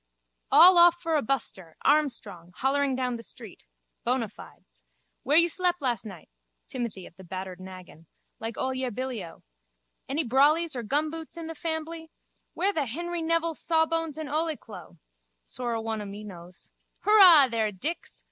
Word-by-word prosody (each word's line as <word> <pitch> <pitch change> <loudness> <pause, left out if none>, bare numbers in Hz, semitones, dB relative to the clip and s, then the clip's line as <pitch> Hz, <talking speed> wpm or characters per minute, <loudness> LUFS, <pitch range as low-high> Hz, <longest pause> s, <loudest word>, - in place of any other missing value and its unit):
_ - - -51 0.5
All 350 +3 +8
off 345 0 +6
for 325 -2 -1
a 300 - +2
buster, 215 -9 -3
armstrong, 225 - 0
hollering 275 0 +1
down 250 -2 -2
the - - -9
street. 230 - -11 0.4
Bonafides. - - -5 0.4
Where 290 +4 +2
you 340 +1 +6
slep 355 +1 0
las 245 -7 -1
nigh? 190 -7 -10 0.4
Timothy 230 -7 -5
of - - -15
the 190 - -12
battered 185 0 -7
naggin. 185 -3 -12 0.3
Like 225 +1 -6
ole 260 0 -1
Billyo. 255 -7 -5 0.7
Any 295 +4 +1
brollies 295 +5 +3
or 245 - -3
gumboots 310 +7 -2
in 335 - -6
the 325 - -6
fambly? 320 0 -5 0.5
Where 395 +3 0
the 295 -6 -1
Henry 345 +7 -4
Nevil's 330 0 0
sawbones 325 -1 0
and 315 -1 -5
ole 310 +1 -1
clo? 180 -5 -12 0.5
Sorra 240 - -4
one 225 -1 -3
o' - - -6
me 200 +1 -8
knows. 180 -3 -12 0.3
Hurrah 370 -9 +8
there, 225 -3 -1
Dix! 290 - -5
265 Hz, 155 wpm, -27 LUFS, 210-325 Hz, 0.7 s, All